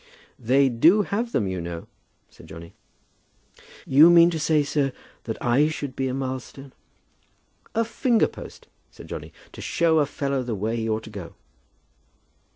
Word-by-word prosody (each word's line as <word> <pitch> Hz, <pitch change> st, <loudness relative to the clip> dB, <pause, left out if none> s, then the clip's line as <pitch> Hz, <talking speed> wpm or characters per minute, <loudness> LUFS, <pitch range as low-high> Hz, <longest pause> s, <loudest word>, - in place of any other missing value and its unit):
"They 130 Hz, +3 st, +3 dB
do 165 Hz, -, +4 dB
have 230 Hz, +5 st, -3 dB
them 105 Hz, -, 0 dB
you 95 Hz, -2 st, -3 dB
know," 85 Hz, 0 st, -6 dB, 0.5 s
said -, -, -16 dB
Johnny. 85 Hz, +1 st, -11 dB, 0.8 s
"Do -, -, -22 dB, 0.2 s
you 150 Hz, +5 st, +7 dB
mean 170 Hz, 0 st, +6 dB
to 160 Hz, -, -3 dB
say, 155 Hz, 0 st, +2 dB
sir, 140 Hz, -2 st, -1 dB, 0.3 s
that 110 Hz, -, -4 dB
I 130 Hz, +5 st, +2 dB
should 145 Hz, -4 st, -6 dB
be 135 Hz, -, -1 dB
a 130 Hz, -, -3 dB
milestone?" 130 Hz, 0 st, -6 dB, 1.0 s
"A 230 Hz, 0 st, +1 dB
finger 230 Hz, +1 st, +1 dB
post," -, -, -12 dB, 0.2 s
said -, -, -14 dB
Johnny, -, -, -7 dB, 0.2 s
"to -, -, -11 dB
show 165 Hz, -2 st, +2 dB
a 145 Hz, -, +2 dB
fellow 140 Hz, -1 st, -2 dB
the 120 Hz, -3 st, -4 dB
way 110 Hz, +4 st, -2 dB
he 115 Hz, -1 st, -2 dB
ought 110 Hz, 0 st, -1 dB
to 110 Hz, -, -11 dB
go." 100 Hz, -5 st, -9 dB
135 Hz, 165 wpm, -24 LUFS, 115-160 Hz, 1.0 s, you